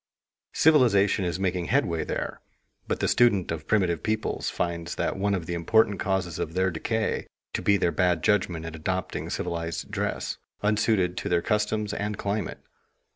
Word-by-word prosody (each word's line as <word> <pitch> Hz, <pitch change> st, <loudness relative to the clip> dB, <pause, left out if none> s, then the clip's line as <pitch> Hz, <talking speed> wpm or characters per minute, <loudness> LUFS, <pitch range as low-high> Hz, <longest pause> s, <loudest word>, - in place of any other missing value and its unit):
Civilization 115 Hz, -11 st, +4 dB
is 85 Hz, +1 st, -2 dB
making 90 Hz, -2 st, 0 dB
headway 85 Hz, 0 st, +1 dB
there; -, -, -4 dB, 0.5 s
but -, -, -2 dB
the -, -, +2 dB
student 105 Hz, -8 st, +3 dB
of 80 Hz, -1 st, -5 dB
primitive 90 Hz, -6 st, +2 dB
peoples 110 Hz, 0 st, -1 dB
finds 85 Hz, -1 st, -3 dB
one 100 Hz, +1 st, 0 dB
of 85 Hz, -4 st, -4 dB
the 85 Hz, -, -3 dB
important 100 Hz, +4 st, +3 dB
causes 95 Hz, -3 st, -1 dB
of 80 Hz, -1 st, -3 dB
their 95 Hz, 0 st, +2 dB
decay 110 Hz, +7 st, -1 dB, 0.3 s
to -, -, -1 dB
be 100 Hz, -, +4 dB
their 85 Hz, -, +1 dB
bad 90 Hz, -3 st, +1 dB
judgment 90 Hz, -6 st, +1 dB
in 80 Hz, -, -6 dB
adopting 90 Hz, +3 st, -3 dB
civilized 85 Hz, -1 st, -3 dB
dress, -, -, -2 dB, 0.2 s
unsuited 105 Hz, -4 st, +2 dB
to -, -, -3 dB
their 85 Hz, -1 st, +2 dB
customs 105 Hz, -1 st, 0 dB
and 105 Hz, 0 st, -2 dB
climate. 100 Hz, +1 st, -3 dB
95 Hz, 160 wpm, -26 LUFS, 85-105 Hz, 0.5 s, Civilization